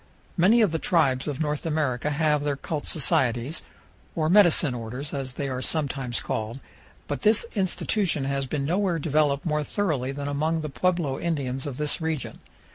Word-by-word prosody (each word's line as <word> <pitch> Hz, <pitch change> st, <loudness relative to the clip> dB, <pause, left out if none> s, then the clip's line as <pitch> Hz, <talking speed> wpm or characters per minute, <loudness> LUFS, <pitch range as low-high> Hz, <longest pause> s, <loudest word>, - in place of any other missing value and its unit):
Many 205 Hz, +7 st, +5 dB
of 210 Hz, -6 st, +4 dB
the 160 Hz, -, -1 dB
tribes 140 Hz, -8 st, +2 dB
of 145 Hz, -2 st, -3 dB
North 150 Hz, -2 st, -1 dB
America 150 Hz, -4 st, 0 dB
have 150 Hz, -1 st, +1 dB
their 145 Hz, -1 st, 0 dB
cult 145 Hz, +2 st, -4 dB
societies, 130 Hz, -2 st, +1 dB, 0.5 s
or 160 Hz, 0 st, +1 dB
"medicine 175 Hz, -8 st, +5 dB
orders," 125 Hz, +5 st, -6 dB
as 135 Hz, -2 st, -4 dB
they 140 Hz, +2 st, -3 dB
are 130 Hz, -1 st, -3 dB
sometimes 135 Hz, -5 st, -2 dB
called, 110 Hz, +4 st, -3 dB, 0.5 s
but 145 Hz, -, -3 dB
this 215 Hz, +2 st, +4 dB
institution 190 Hz, -, 0 dB
has 135 Hz, 0 st, -1 dB
been 140 Hz, +1 st, -2 dB
nowhere 180 Hz, +2 st, +1 dB
developed 145 Hz, -2 st, +1 dB
more 150 Hz, -2 st, 0 dB
thoroughly 150 Hz, -8 st, -1 dB
than 140 Hz, +1 st, -5 dB
among 155 Hz, +3 st, 0 dB
the 155 Hz, -, -4 dB
pueblo 170 Hz, -2 st, 0 dB
Indians 135 Hz, -5 st, -2 dB
of 135 Hz, -3 st, -5 dB
this 150 Hz, +2 st, 0 dB
region. 160 Hz, -3 st, -3 dB
150 Hz, 170 wpm, -26 LUFS, 135-165 Hz, 0.5 s, Many